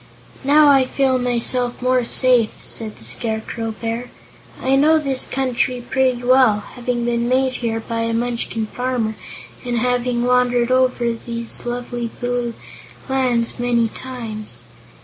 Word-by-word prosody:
"Now 295 +2 +5
I 270 -2 +5
feel 260 0 +1
myself 245 0 0
more 255 0 +1
safe," 245 -1 +6
said 220 -2 -1
the - - -16
Scarecrow 220 - -2
Bear. 230 +2 -4 0.5
"I 265 +1 +1
know 305 +4 +4
this 275 -4 0
country 255 -1 -1
pretty 255 -2 0
well, 250 -4 +4
having 240 -1 -3
been 235 0 -1
made 260 0 +1
here 225 -2 -2
by 230 0 -5
a 230 0 -1
Munchkin 230 -1 -2
farmer 245 -1 -2 0.5
and 245 -1 -2
having 245 0 0
wandered 245 -1 +2
over 255 -2 +2
these 235 +1 -7
lovely 240 -1 -4
blue 245 -1 -2 0.5
lands 250 -4 0
many 240 -2 +1
times. 230 -4 -8
245 Hz, 135 wpm, -19 LUFS, 235-255 Hz, 0.5 s, safe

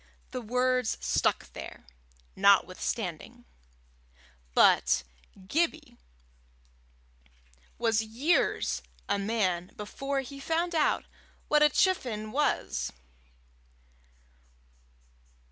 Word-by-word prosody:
The 255 - -4
word 250 +1 +1
stuck 60 - 0
there, - - -9 0.5
notwithstanding; 200 +3 +1 1.1
but - - +5 0.4
Gibbie 315 - -1 1.8
was 225 -2 +2
years 240 +10 +1 0.3
a 200 0 0
man 190 -4 0
before 275 +6 -3
he 275 +1 -9
found 335 +5 -1
out 315 -2 +2 0.4
what 300 0 +4
a 300 - +7
chifenn 240 - 0
was. 295 +4 0
240 Hz, 75 wpm, -29 LUFS, 210-290 Hz, 1.8 s, a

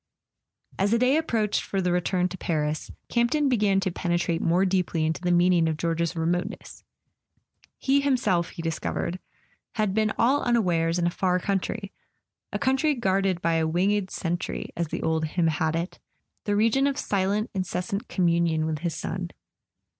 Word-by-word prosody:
As 195 +1 +2
the 230 - +3
day 250 +4 +3
approached 230 -10 +1
for 195 - -3
the 180 -1 +1
return 180 +1 +1
to 180 - -6
Paris, 155 -4 -2 0.2
Camp¬ 235 0 +2
ton 300 0 +1
began 205 -6 +3
to 190 - -1
penetrate 175 -1 -1
more 180 +3 +3
deeply 180 -4 0
into 160 +2 -1
the 180 - -1
meaning 175 -1 +4
of 155 - -2
George's 170 +1 -1
remoteness. 175 +5 -3 0.9
He 280 +1 +2
himself, 225 -11 +1
he 165 - -8
discovered, 170 +2 -2 0.5
had 215 -4 0
been 215 0 +2
all 265 +5 +3
unawares 175 -8 +1
in 175 - +1
a 175 - +2
far 180 0 +1
country, 200 +2 -2 0.6
a - - -1
country 275 +3 +2
guarded 195 -5 0
by 165 -1 +2
a 160 -1 +1
winged 190 +4 +1
sentry, 175 0 -3
as 170 -1 -1
the - - -4
old 160 0 +1
hymn 165 +2 0
had 160 0 +1
it: 170 +2 -4 0.5
the 205 - +1
region 230 +6 +3
of 280 0 -1
silent 200 0 0
incessant 190 +1 -3
communion 170 -3 +1
with 155 -1 -2
his 170 0 -2
son. - - -4
180 Hz, 170 wpm, -26 LUFS, 170-210 Hz, 0.9 s, meaning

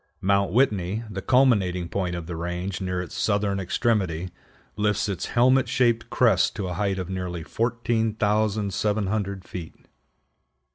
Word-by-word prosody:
Mount 100 -1 +2
Whitney, 105 -3 +1
the 95 -1 -4
culminating 100 -9 +3
point 90 -1 -2
of 85 -2 -5
the 85 0 -5
range 90 +3 -4
near 90 -1 -2
its 90 - -10
southern 100 -1 0
extremity, 95 -3 0 0.4
lifts 105 0 +1
its 95 -4 -3
helmet 130 +2 +3
shaped 120 -2 +1
crest 115 -6 +3
to 100 -4 -3
a 90 - -3
height 100 +1 -1
of 90 -2 -3
nearly 90 -3 -4
14,700 105 -3 0
feet. 85 -3 -8
100 Hz, 135 wpm, -25 LUFS, 90-110 Hz, 0.4 s, culminating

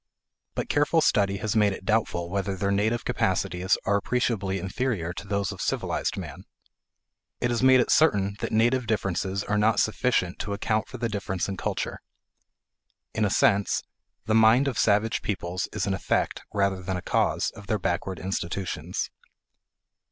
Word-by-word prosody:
But - - -2
careful 150 +3 +2
study 100 -8 +2
has 110 +2 -2
made 105 -2 +4
it 95 - -9
doubtful 95 -6 0
whether 100 0 -1
their 100 +1 -1
native 110 +4 0
capacities 95 -4 0
are 100 +1 +3
appreciably 100 -4 -1
inferior 95 -2 -2
to 100 - -8
those 100 -2 -1
of - - -7
civilized - - -1
man. - - -7 0.9
It 120 - 0
has 120 - 0
made 130 0 +6
it 125 - +2
certain 100 -10 +3
that - - -3
native 120 +2 +2
differences 100 -2 -1
are 105 0 0
not 110 +1 +3
sufficient 110 -5 +1
to 100 - -3
account 110 0 -1
for 130 - -8
the 120 -1 -1
difference 100 -4 -3
in 100 - -3
culture. - - -3 1.1
In 110 - +1
a - - +1
sense 100 +1 +2 0.4
the 110 - 0
mind 110 +5 +5
of 135 - -1
savage 105 +1 +2
peoples 90 -2 -3
is - - -2
an 100 - 0
effect, 95 - -1
rather 100 -2 0
than 95 0 -3
a 90 - -6
cause, - - +1
of 105 -2 -13
their 110 - +1
backward 95 0 -2
institutions. 95 0 -3
100 Hz, 165 wpm, -26 LUFS, 95-115 Hz, 1.1 s, made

